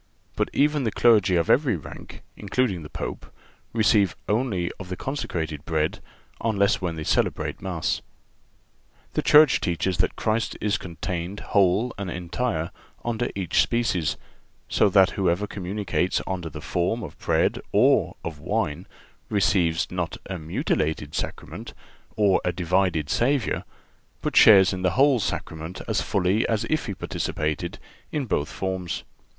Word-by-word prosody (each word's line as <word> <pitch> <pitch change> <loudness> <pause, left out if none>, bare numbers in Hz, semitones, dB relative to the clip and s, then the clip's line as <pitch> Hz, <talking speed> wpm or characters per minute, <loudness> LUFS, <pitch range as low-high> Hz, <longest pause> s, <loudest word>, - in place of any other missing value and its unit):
But - - 0
even 150 0 +2
the 115 - +1
clergy 105 -4 +4
of 85 -2 +2
every 135 -5 +3
rank, 80 - -10
including 105 -2 -1
the 75 - -9
Pope, - - -6 0.4
receive 105 -4 +3
only 105 -6 0
of 95 -2 -8
the 90 - -3
consecrated 80 - -4
bread 80 -2 -1 0.4
unless 100 -3 +2
when 85 -3 -2
they 80 - -5
celebrate - - 0
Mass. 90 -4 -2 1.1
The - - +1
Church 150 0 +6
teaches 85 +1 -1
that 90 - +1
Christ 110 +1 -1
is 105 -1 0
contained 90 +2 -5
whole 100 +5 +3
and 100 -2 -3
entire 90 0 -2 0.3
under 120 +1 -1
each 95 -3 +2
species; 115 -9 0 0.5
so 105 - +3
that 95 -1 +5
whoever 95 +1 +1
communicates 95 -2 -1
under 90 -3 -3
the 75 0 -8
form 90 +8 -1
of - - -8
bread - - +1
or - - +3
of 80 -3 -5
wine 85 -2 -2 0.4
receives 95 -4 +2
not 90 -2 -3
a 95 -2 -4
mutilated 80 -1 -1
Sacrament - - -5 0.4
or 100 -3 +3
a 90 - +1
divided 90 -2 +1
Savior, 125 +2 +1 0.6
but - - -2
shares 100 -3 +8
in 90 - -4
the 90 +3 0
whole 135 -2 +5
Sacrament 80 -3 -4
as - - +1
fully 95 +3 +1
as 110 -2 +1
if 155 -3 0
he 100 - -3
participated 75 -3 -3 0.3
in 145 -3 -1
both 80 -9 -1
forms. 95 -2 -3
95 Hz, 145 wpm, -25 LUFS, 85-110 Hz, 1.1 s, shares